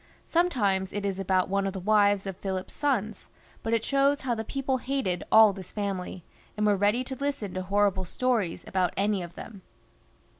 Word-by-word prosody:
Sometimes 205 - +1
it 205 0 -3
is 195 -1 -2
about 190 -1 +1
one 195 0 0
of 195 - -3
the 190 - -4
wives 205 0 +3
of 195 -2 -6
PhiKp's 190 -1 -4
sons; 220 -8 -1 0.3
but 225 - -3
it 230 -1 +1
shows 275 +1 +2
how 255 -2 -1
the 220 -1 -3
people 270 +2 -1
hated 255 -9 -2
all 220 -2 +8
this 190 -2 -10
family, 195 -4 -4 0.3
and 210 - +1
were 205 -1 +4
ready 205 +5 +2
to 265 - -6
listen 275 -7 -3
to 185 - -3
horrible 195 0 +1
stories 225 -3 -1
about 185 -2 0
any 200 0 +1
of 175 -1 -8
them. 205 -4 -10
205 Hz, 190 wpm, -27 LUFS, 190-240 Hz, 0.3 s, all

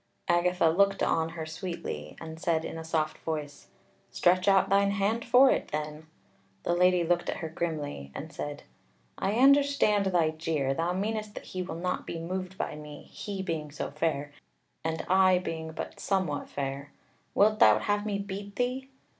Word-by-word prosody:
Agatha 175 0 +3
looked 195 +4 +3
on 160 0 +1
her 160 -1 -6
sweetly, 155 - -6
and 160 0 -8
said 165 -1 0
in - - -5
a 165 - -6
soft 160 -1 -1
voice: 150 -3 -5 0.4
"Stretch 180 +2 +2
out 195 -1 +5
thine 200 +1 +3
hand 200 +4 0
for 255 +2 +6
it - - 0
then." 150 +1 -5 0.6
The 175 - +1
Lady 180 0 +4
looked 175 +1 +1
at - - -2
her 160 - -5
grimly, 150 - -4
and 155 +1 -7
said: 145 -1 -5 0.6
"I 195 - 0
understand 270 -5 +4
thy 170 -4 +2
jeer; 155 -4 -1
thou 165 +4 0
meanest 210 +2 -2
that - - -8
he 185 - -4
will 180 -2 -5
not 180 +2 -3
be - - -4
moved 185 +3 -4
by - - -3
me, 150 -1 -9
he 195 -2 -5
being 160 -4 -3
so 145 - -5
fair, 145 -1 -1 0.5
and 160 0 -2
I 185 0 +5
being 160 -3 -4
but 160 - -6
somewhat 185 -7 -1
fair. 140 0 -4 0.4
Wilt 215 +1 +4
thou 105 0 +7
have 205 - 0
me 210 -1 -1
beat 200 0 -6
thee? 255 +2 -1
175 Hz, 175 wpm, -29 LUFS, 155-195 Hz, 0.6 s, thou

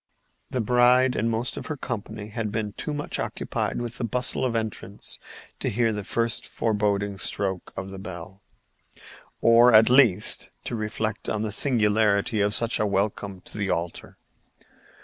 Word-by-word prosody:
The 125 - -1
bride 125 +2 +4
and 115 - 0
most 115 +2 -2
of - - -6
her 155 - -4
company 110 -4 -5
had 110 -1 -3
been 105 -2 -3
too 150 - -5
much 145 0 -3
occupied - - -3
with 120 -1 -6
the - - -2
bustle 125 +4 0
of 125 -3 0
entrance 110 -3 -4 0.4
to - - -1
hear 115 +1 +1
the 105 -1 -4
first 115 +3 0
boding 100 -2 0
stroke 95 +2 -2
of 95 +1 -5
the 95 - -8
bell—or, 95 0 -9 1.3
at 110 +1 +7
least, 115 -7 +5
to - - -4
reflect 110 0 -3
on 110 0 -1
the 110 - -2
singularity 105 -3 +2
of 105 +1 +2
such 115 0 +1
a 105 - +2
welcome 100 -1 -2
to 105 - -9
the 100 -1 -1
altar. 85 +1 -4
110 Hz, 160 wpm, -25 LUFS, 100-115 Hz, 1.3 s, at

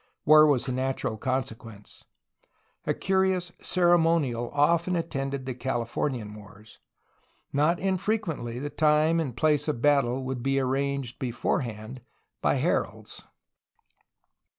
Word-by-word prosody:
War 155 0 +8
was 130 -5 +2
the 130 - -3
natural 130 -3 -2
consequence. 115 -3 -5 0.8
A - - +2
curious 190 -2 0
ceremonial 165 -9 +2
often 170 +5 +2
attended 140 -5 -3
the 130 - -3
Californian 120 -2 -3
wars. 105 0 -14 0.7
Not 155 +5 +2
infrequently 185 - -2
the 145 +3 -5
time 155 +2 +3
and 135 -7 -3
place 150 +2 +2
of 150 -6 -1
battle 135 -2 +2
would 130 -1 -4
be 135 +2 +1
arranged 135 -1 -2
beforehand 120 -1 -3 0.4
by - - +2
heralds. - - -2
135 Hz, 110 wpm, -27 LUFS, 120-160 Hz, 0.8 s, War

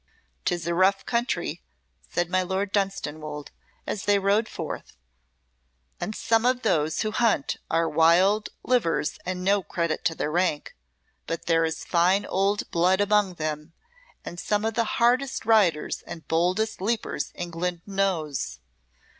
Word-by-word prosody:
"'Tis 175 -2 -1
a 170 - 0
rough 190 +3 +3
country," 240 +1 -1 0.5
said 175 0 0
my 185 +1 +1
Lord 190 +2 -2
Dunstanwolde, 155 -7 -3 0.3
as 200 - -4
they 205 0 +4
rode 200 +3 +2
forth, - - -6 1.0
"and 200 +5 -4
some 225 0 +2
of 250 0 +2
those 155 0 +1
who 215 - -1
hunt 220 -10 +1
are 165 0 +2
wild 175 +7 +4
livers 220 -12 +1
and 180 0 -3
no 200 +1 +3
credit 170 -3 -2
to 165 -1 +1
their 150 - -2
rank, 170 -3 0 0.5
but 165 - -4
there 165 -1 +3
is 160 0 -4
fine 185 +3 +3
old 195 +2 0
blood 180 +3 +3
among 205 -2 +2
them, 155 0 -4 0.5
and 175 - -7
some 210 +4 0
of 225 - 0
the 230 +1 +1
hardest 250 +3 +2
riders 200 -9 +3
and 160 -3 -9
boldest 180 +6 0
leapers 220 +3 -2
England 175 0 -3
knows." 190 -8 -1
185 Hz, 145 wpm, -26 LUFS, 165-205 Hz, 1.0 s, they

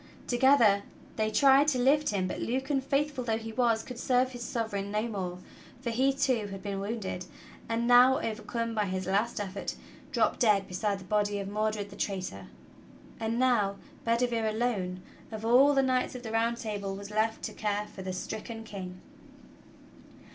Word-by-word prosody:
Together 240 -5 +5 0.3
they 215 -1 +1
tried 270 +6 +5
to 290 -4 +2
lift 285 +4 +3
him, 190 -3 0
but - - -4
Lucan, 265 +3 -1
faithful 275 0 0
though 225 -2 0
he 225 0 -6
was, 230 -2 +2
could 250 -2 -8
serve 255 0 +2
his 245 -1 -8
Sovereign 220 -6 -3
no 210 +1 0
more, 190 -6 -3 0.4
for 245 -2 -3
he, 260 +4 +3
too, 260 -6 0
had 195 -1 -8
been 200 -1 -3
wounded, 195 -3 -4 0.4
and 230 +1 0
now, 250 +2 +7
overcome 230 +1 -3
by 210 -2 +1
his 185 -1 -3
last 205 +5 0
effort, 200 -1 -4 0.4
dropped 235 -5 +1
dead 205 -4 +3
beside 200 +2 -1
the - - -11
body 205 +1 +1
of 200 -1 -4
Mor 215 +2 0
dred, 205 -1 -5
the - - -10
traitor. 185 - -4 0.7
And 225 +1 -1
now 240 -6 +2 0.3
Bedivere 230 -1 +1
alone, 205 -6 -1 0.3
of 220 0 -5
all 265 +5 +6
the 270 - +4
knights 255 -1 +1
of 250 - -7
the 225 - -5
Round 230 +1 +1
Table, 205 -4 -4
was 200 +1 -8
left 220 +1 0
to - - -4
care 210 -1 -1
for 205 -2 -10
the 190 0 -4
stricken 220 +4 -5
King. 185 -4 -7
220 Hz, 180 wpm, -29 LUFS, 200-245 Hz, 0.7 s, now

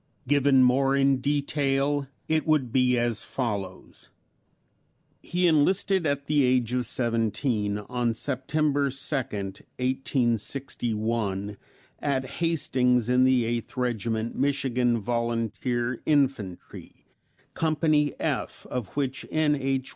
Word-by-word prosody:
Given 140 -1 +4
more 135 +2 +3
in 135 -1 +3
detail 140 0 0 0.2
it 160 0 0
would 145 -6 +2
be 125 -1 +3
as 120 -2 0
follows: 100 -7 -5 1.1
He 180 +1 -1
enlisted 180 +3 +2
at 140 0 -1
the 145 -1 +2
age 125 -2 +2
of 125 -2 0
seventeen, 115 -3 0
on 120 +2 -2
September 140 +3 0
2, 135 - -5 0.2
1861, 115 -2 -2 0.4
at 135 -2 -1 0.2
Hastings 125 -7 +2
in 125 +1 +4
the 130 -2 +3
Eighth 120 +2 -3
Regiment 115 -2 -1
Michigan 130 -3 +1
Volunteer 120 +2 -2
Infantry; 135 - -1 0.5
Company 155 -2 +1
F - - -3
of 125 -5 -3
which 135 -2 -2
N. 155 -1 +2
H. 135 -1 -2
130 Hz, 105 wpm, -26 LUFS, 115-140 Hz, 1.1 s, Given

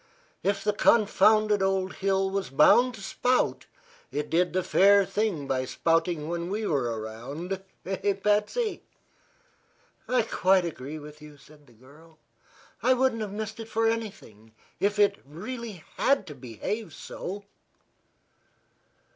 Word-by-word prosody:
If 200 0 0
the 210 0 +1
confounded 215 -1 +4
old 190 -1 0
hill 195 0 +1
was 195 -5 -2
bound 235 - +5
to 200 - -11
spout, 250 +5 0 0.4
it 150 +1 -3
did 175 +2 +2
the 185 +1 0
fair 200 +2 +5
thing 195 -7 -1
by 130 -1 0
spouting 165 +2 0
when 170 +1 -3
we 210 +2 -2
were 120 - 0
around. 140 - -6 0.2
Eh, 195 +2 0
Patsy?" 210 - 0 1.3
"I 250 -2 +2
quite 190 -4 +2
agree 150 -2 -6
with 150 0 -11
you," 150 -1 -13
said 150 0 -19
the 120 - -20
girl. 150 +7 -19 0.6
"I 255 - +4
wouldn't 255 -3 +1
have 210 -2 -4
missed 220 +1 -5
it 225 0 -7
for 225 +1 +1
anything 190 - -5 0.3
if 205 +1 +1
it 200 -1 +3
really 205 - -7
had 275 -7 +2
to 155 - -8
behave 135 - -5
so." 200 +3 -7
190 Hz, 140 wpm, -27 LUFS, 150-215 Hz, 1.3 s, bound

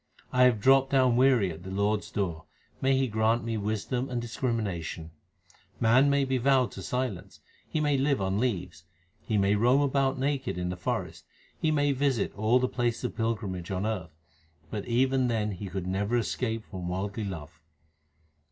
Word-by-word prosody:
1 125 0 +4
have 120 -4 +3
dropped 135 +4 +5
down 130 -3 +3
weary 125 -7 +4
at 80 +1 -9
the 95 - -8
Lord 100 +2 +1
s - - -12
door: 85 -5 -3 0.4
may 135 0 +3
He 135 0 +2
grant 110 +1 +1
me 115 0 -2
wisdom 110 +5 -2
and 125 -2 -2
discrimination! 110 -9 -3 0.7
Man 125 +5 +5
may 140 -1 +2
be 130 -1 0
vowed 130 0 +3
to - - -8
silence; 125 -8 -4 0.3
he 155 - -1
may 145 -2 +2
live 140 0 +2
on 95 +1 0
leaves; 95 -8 -2 0.5
2 - - -2
he - - +3
may 100 0 +3
roam 120 +6 +4
about 135 -1 +1
naked 135 -4 -1
in 90 0 -2
the 90 - -3
forest; 90 - -3 0.3
He 160 - 0
may 145 -2 +2
visit 135 -4 0
all 110 +4 +3
the 130 0 +1
places 120 -2 -1
of - - -3
pilgrimage 105 -6 -2
on 95 +1 -2
earth; 90 -8 -4 0.5
but 105 -1 -4
even 130 +2 +2
then 110 -3 0
he 100 +1 -6
could 95 0 -4
never 100 +5 0
escape 115 -1 -2
from 90 -3 -6
worldly 100 +4 -3
love. 80 -4 -7
115 Hz, 185 wpm, -28 LUFS, 100-130 Hz, 0.7 s, dropped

